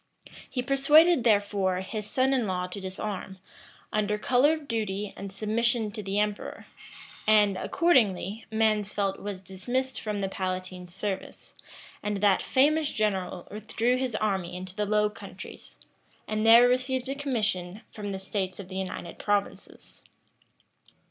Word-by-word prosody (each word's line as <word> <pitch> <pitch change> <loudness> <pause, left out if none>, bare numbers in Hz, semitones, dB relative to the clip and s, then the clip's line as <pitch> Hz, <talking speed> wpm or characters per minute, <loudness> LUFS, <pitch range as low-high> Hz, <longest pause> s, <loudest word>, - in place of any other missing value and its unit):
[*] - - -17
He 250 - -2
persuaded, 280 +3 +5
therefore, 200 -4 +2
his 210 +2 -5
son 265 +1 +2
in 245 -5 +1
law 180 -1 -1
to 180 +2 -6
disarm, 190 0 -5 0.6
under 210 0 +1
color 255 +7 +3
of 310 -3 -6
duty 210 -3 -2
and 195 0 -7
submission 220 +2 0
to 210 +1 -5
the 195 0 -3
emperor; 210 0 -2 0.6
and, 210 -2 +5
accordingly, 215 - +1
Mansfeldt 210 -3 +1
was 195 -2 -6
dismissed 245 +8 -3
from 210 -1 -3
the 195 - -1
palatine's 185 -1 -4
service; 195 +1 -5 0.5
and 210 -1 -2
that 195 -1 +3
famous 300 +3 +3
general 195 -6 -1
withdrew 220 +3 0
his 255 -3 -2
army 190 -5 -1
into 185 0 -7
the 210 0 -1
Low 210 0 +3
Countries, 210 - -10 0.5
and 215 +1 0
there 235 +2 +9
received 255 +1 0
a 270 - -1
commission 215 -9 -1
from 205 -1 -6
the 195 - -3
states 190 -1 -3
of 190 -2 -8
the 190 - -5
United 185 -2 -5
Provinces. 205 -1 -3
210 Hz, 145 wpm, -28 LUFS, 190-240 Hz, 0.6 s, there